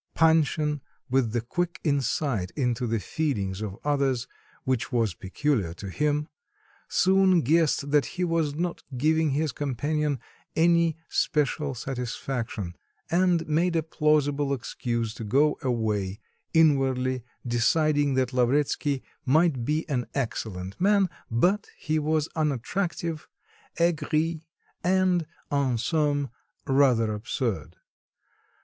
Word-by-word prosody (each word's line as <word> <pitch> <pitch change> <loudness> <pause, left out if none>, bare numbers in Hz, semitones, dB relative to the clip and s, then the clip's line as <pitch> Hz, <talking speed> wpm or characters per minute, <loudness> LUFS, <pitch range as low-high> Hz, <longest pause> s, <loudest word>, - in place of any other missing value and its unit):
Panshin, 155 -2 +3 0.3
with 130 -4 +2
the 120 0 0
quick 175 +8 -2
insight 135 - 0
into 125 -3 0
the 115 0 0
feelings 100 -9 -2
of 100 -3 -5
others, 140 -4 +1 0.4
which 130 -1 -1
was 115 -6 +1
peculiar 95 - -1
to 100 - -7
him, 150 +5 0 0.6
soon 190 -1 +4
guessed 150 -1 +2
that 145 -5 +3
he 180 - +1
was 165 -4 0
not 170 +2 -2 0.2
giving 160 +3 +2
his 150 +2 0
companion 145 +2 -1 0.4
any 170 -1 +3
special 150 -2 0
satisfaction, 120 -6 -4 0.4
and 175 -1 +2
made 165 +3 +1
a 165 - +2
plausible 145 -3 +1
excuse 115 -2 -3
to 115 - -7
go 140 +8 +2
away, 105 - -1 0.3
inwardly 130 -5 +3 0.2
deciding 145 +4 +2
that 130 -1 +1
Lavretsky 135 +2 +1 0.2
might 150 -2 +3
be 155 +6 -1
an 125 -6 -1
"excellent 105 - -4
man," 200 -2 +4 0.2
but 180 - +2
he 155 0 -1
was 155 0 +1
unattractive, 160 - -2 0.5
aigri, 160 -1 +1 0.4
and, 180 -2 +2 0.2
en 140 -4 +1
somme, 145 +2 0 0.3
rather 125 -5 +3
absurd. 105 - -3
145 Hz, 115 wpm, -26 LUFS, 120-160 Hz, 0.6 s, soon